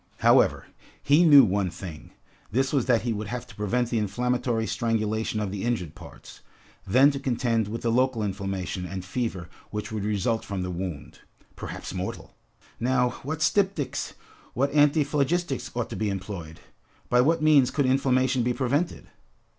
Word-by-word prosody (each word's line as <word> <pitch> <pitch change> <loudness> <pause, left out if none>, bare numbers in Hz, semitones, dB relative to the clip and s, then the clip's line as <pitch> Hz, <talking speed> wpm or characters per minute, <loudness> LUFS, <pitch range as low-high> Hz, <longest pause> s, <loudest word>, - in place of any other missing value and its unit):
However, - - +4 0.4
he 145 +5 +5
knew 145 -5 +9
one 100 -3 +1
thing, 85 -2 -9 0.4
this 130 +5 0
was 135 -4 +1
that 120 -3 +3
he 120 -1 0
would 105 0 -4
have 120 +2 -5
to 125 - -14
prevent 115 +4 -1
the 115 - +1
inflammatory 120 +2 -1
strangulation 110 -2 -1
of 105 -3 -2
the 100 -1 -4
injured 110 -10 -2
parts, - - -13 0.5
then 130 +9 +5
to 140 - -4
contend 120 -4 0
with 115 +2 -5
the 115 - +1
local 125 -2 +1
inflammation 95 -2 -3
and 95 +1 -6
fever 95 -4 -3 0.2
which 105 0 -5
would 110 -2 -3
result 105 +2 0
from 95 -2 -4
the 90 - -3
wound, 90 -4 -6 0.4
perhaps - - -7
mortal! 95 0 -5 0.5
Now, 125 +1 +2
what 155 +3 -3
styptics, 165 -9 0 0.4
what 140 +3 0
antiphlogistics 145 -2 +2
ought 120 -1 -2
to - - -4
be 110 -1 -1
employed? 95 -5 -6 0.5
By 125 0 +4
what 160 +4 +2
means 145 -5 +5
could 140 +1 0
inflammation 130 -1 +2
be 125 +1 +1
prevented? 140 +6 -1
120 Hz, 160 wpm, -26 LUFS, 100-135 Hz, 0.5 s, knew